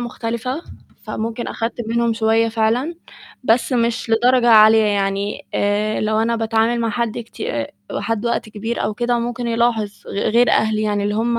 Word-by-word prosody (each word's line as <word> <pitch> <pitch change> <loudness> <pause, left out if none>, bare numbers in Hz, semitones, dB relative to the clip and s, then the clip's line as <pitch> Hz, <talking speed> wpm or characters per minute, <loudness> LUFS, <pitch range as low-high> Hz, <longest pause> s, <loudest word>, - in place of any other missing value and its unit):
مختلفة، 240 +4 -4 0.4
فممكن 225 +2 -4
آخدت 230 0 -3
منهم 235 0 +1
شوية 225 0 +2
فعلًا، 230 +8 0 0.5
بس 235 +3 +2
مش 230 -3 0
لدرجة 240 +2 +3
عالية، 220 0 +7
يعني 200 0 -1
آآ 205 +1 0
لو 215 0 0
أنا 230 +1 +1
باتعامل 225 +1 +1
مع 230 - 0
حد 235 0 -2
كتي 235 -1 -6
آآ 115 -1 -3 0.2
وحد 225 +2 -2
وقت 235 -1 -1
كبير 220 +2 -4
أو 210 - -2
كده، 240 +2 0
ممكن 240 +1 -3
يلاحظ 230 -2 +1 0.2
غ - - -8 0.2
غير 235 +1 +4
أهلي 215 0 +2
يعني، 205 -1 0
اللي 205 0 -1
هُم 235 +2 0
225 Hz, 170 wpm, -19 LUFS, 215-235 Hz, 0.5 s, عالية